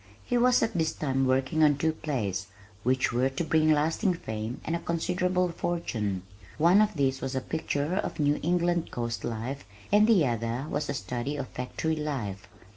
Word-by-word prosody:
He 245 - -1
was 245 0 +4
at 225 0 0
this 160 -3 0
time 135 -3 0
working 130 +4 +2
on 145 -2 +5
two 160 +2 +2
plays 100 -12 -2 0.3
which 130 +1 +1
were 125 +2 +2
to 135 +6 -3
bring 155 -1 +3
lasting 160 +6 +2
fame 110 -4 -5
and 165 - -1
a - - -1
considerable 180 +2 0
fortune. 110 - -2 0.3
One 175 +6 +6
of 215 -3 +1
these 135 -2 +1
was 135 0 -3
a - - +2
picture 155 +3 -2
of - - -3
New 145 0 +2
England 175 0 +1
coast 115 -1 -3
life 120 +5 -4 0.3
and 210 +1 +6
the 200 -9 +5
other 115 +2 -1
was 145 0 -2
a 140 - -1
study 125 +6 -3
of 135 -2 -4
factory 145 +5 -2
life. 115 -11 -4
145 Hz, 185 wpm, -28 LUFS, 125-170 Hz, 0.3 s, One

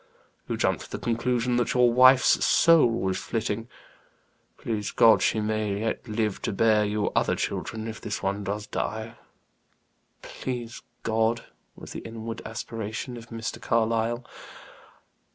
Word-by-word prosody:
"You - - -1
jumped - - 0
to - - -15
the - - -4
conclusion 120 +1 0
that 120 0 0
your 125 -1 +5
wife's 130 +1 +6
soul 165 -5 +6
was 95 -5 -1
flitting. 115 0 -3 0.9
Please 105 -3 -3
God, 115 - +5
she 110 - +2
may 105 -1 -1
yet 115 +2 -3
live 110 -2 -1
to - - -2
bear 105 +1 +3
you 105 0 -1
other - - +2
children, 110 0 -3
if 110 -1 -7
this 105 - -4
one 100 +1 -1
does 105 +1 -3
die." 110 +1 -4 1.1
"Please 120 -3 -6 0.2
God!" 115 +1 +1 0.3
was - - -11
the - - -5
inward 115 0 -7
aspiration 110 +2 -5
of 115 -1 -10
Mr. 115 0 -5
Carlyle. 115 +1 0
115 Hz, 140 wpm, -26 LUFS, 110-120 Hz, 1.1 s, wife's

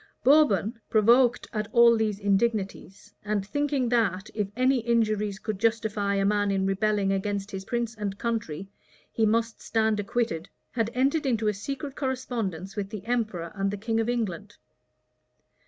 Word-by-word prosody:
Bourbon, 235 - +4
provoked 240 +3 +4
at 215 -1 -2
all 235 -1 +6
these 215 -2 0
indignities, 200 -1 -1
and 210 -2 -1
thinking 280 +2 0
that, 215 -5 0
if 210 -2 -1
any 255 +1 +3
injuries 215 -3 0
could 210 -2 -4
justify 215 -3 0
a 195 0 +1
man 205 0 +2
in 195 -1 +1
rebelling 195 0 +1
against 200 +1 -2
his 190 0 -6
prince 235 -1 -2
and 205 -2 -4
country, 205 -7 -3 0.4
he 220 -1 +2
must 225 +1 0
stand 220 -1 +1
acquitted, 205 -4 -2 0.2
had 230 -2 0
entered 275 +4 +1
into 225 -4 +1
a 210 - +2
secret 275 +7 -5
correspondence 230 - -3
with 200 -2 -3
the 210 -2 -7
emperor 215 -8 -2
and 195 -1 -1
the 205 - -3
king 225 +2 -1
of 225 +1 0
England. 205 -5 -3
215 Hz, 155 wpm, -27 LUFS, 200-235 Hz, 0.4 s, all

